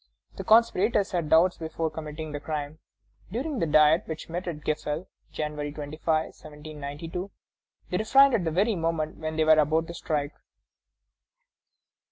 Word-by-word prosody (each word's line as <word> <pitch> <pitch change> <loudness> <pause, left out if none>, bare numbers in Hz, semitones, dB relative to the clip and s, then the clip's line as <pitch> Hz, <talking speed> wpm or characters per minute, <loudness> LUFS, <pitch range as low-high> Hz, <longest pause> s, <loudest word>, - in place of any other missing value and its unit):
The - - -4
conspirators 215 -2 +3
had 170 -5 -1
doubts 175 +3 +4
before 160 0 -3
committing 155 0 -6
the 145 - -4
crime. 150 0 -5 0.5
During 265 - -3
the 165 - +1
Diet, 155 +2 +5
which 160 0 -6
met 175 +2 -4
at 155 -3 -4
Gefle, 155 +2 -2 0.3
January 150 -1 -4
25, 150 +1 -8 0.2
1792, 155 +4 -8 0.6
they 180 - +1
refrained 270 +6 +5
at 205 - +2
the 165 - 0
very 200 +7 +1
moment 165 -2 -2
when 155 0 -4
they 160 - +2
were 160 - +5
about 160 +2 +2
to 170 - -8
strike. 150 -3 -2
160 Hz, 150 wpm, -27 LUFS, 150-180 Hz, 0.6 s, Diet